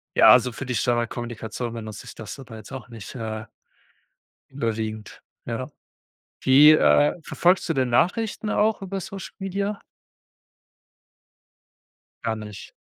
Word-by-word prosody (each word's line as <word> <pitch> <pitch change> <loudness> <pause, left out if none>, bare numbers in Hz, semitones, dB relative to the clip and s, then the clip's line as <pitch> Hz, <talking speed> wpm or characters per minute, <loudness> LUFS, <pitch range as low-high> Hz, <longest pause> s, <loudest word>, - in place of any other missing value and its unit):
ja, - - +8
also, 125 0 +6
für 130 - -6
die 125 -1 -2
Standardkommunikation 120 0 -2
benutze 110 -3 -7
ich - - -10
das 110 +5 -8
aber 120 -4 -10
jetzt 110 +4 -12
auch 130 -2 -8
nicht, 115 +1 -9
äh 110 -2 -5 1.1
überwiegend, 110 -4 -4 0.2
ja. 120 +4 -4 0.7
Wie 140 +4 +8
äh, 150 -1 +5
verfolgst 180 +1 +2
du - - +2
denn 130 -3 +1
Nachrichten 210 - +1
auch 215 -1 +2
über 195 0 -4
Social 195 0 -8
Media? 200 +2 -2 2.4
Gar 115 -1 0
nicht. 105 -2 -9
125 Hz, 125 wpm, -24 LUFS, 115-175 Hz, 2.4 s, ja